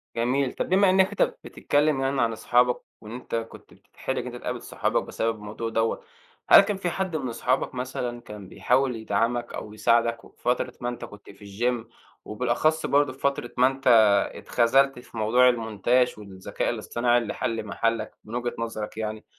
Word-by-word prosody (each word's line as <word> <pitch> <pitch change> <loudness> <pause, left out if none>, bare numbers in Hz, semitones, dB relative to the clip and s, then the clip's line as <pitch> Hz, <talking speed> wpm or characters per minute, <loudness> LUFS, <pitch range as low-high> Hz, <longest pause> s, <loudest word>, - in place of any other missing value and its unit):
جميل، 125 +3 0
طب - - -3
بما 195 +1 +4
إنك 190 +1 +4
أنت 205 - -4 0.2
بتتكلم 145 -1 0
يعني 135 -1 0
عن 115 - +2
اصحابك، 125 +2 +2 0.2
وإن 110 0 -10
أنت 120 -1 -6
كنت 115 0 -7
بتتحرج - - -6
إن - - -2
أنت - - -7
تقابل - - -5
صحابك - - -1
بسبب 115 0 -2
الموضوع 105 +2 -6
دوّة. 115 0 -1 0.5
هل - - +10
كان 200 0 -2
في 180 -2 -2
حد 185 -1 -3
من 135 -5 -2
اصحابك 130 +3 -1
مثلًا 125 -1 -4
كان 105 -3 -10
بيحاول 130 +5 +1
يدعمك، 115 +2 -1
أو 105 - -7
يساعدك، 115 +1 +1
وفي - - -21
فترة 125 0 0
ما 120 - -1
أنت 120 - -6
كنت 105 -1 -14
في 100 - -15
الچيم، 115 +3 -2 0.4
وبالأخص 125 +8 0
برضه 145 -2 +2
في 130 - -19
فترة 140 -3 -1
ما 125 - +6
أنت 135 0 -4 0.5
اتخذلت 135 +2 +2
في 120 - -13
موضوع 120 +4 +4
المونتاج 120 +2 +1
والذكاء 95 -3 -4
الاصطناعي 120 0 0
اللي 120 -2 -2
حل 115 -3 -3
محلّك 115 +3 -1
من 110 +3 -8
وجهة 120 0 -2
نظرك 110 -2 -5
يعني. 110 -1 -4
120 Hz, 180 wpm, -25 LUFS, 115-130 Hz, 0.5 s, هل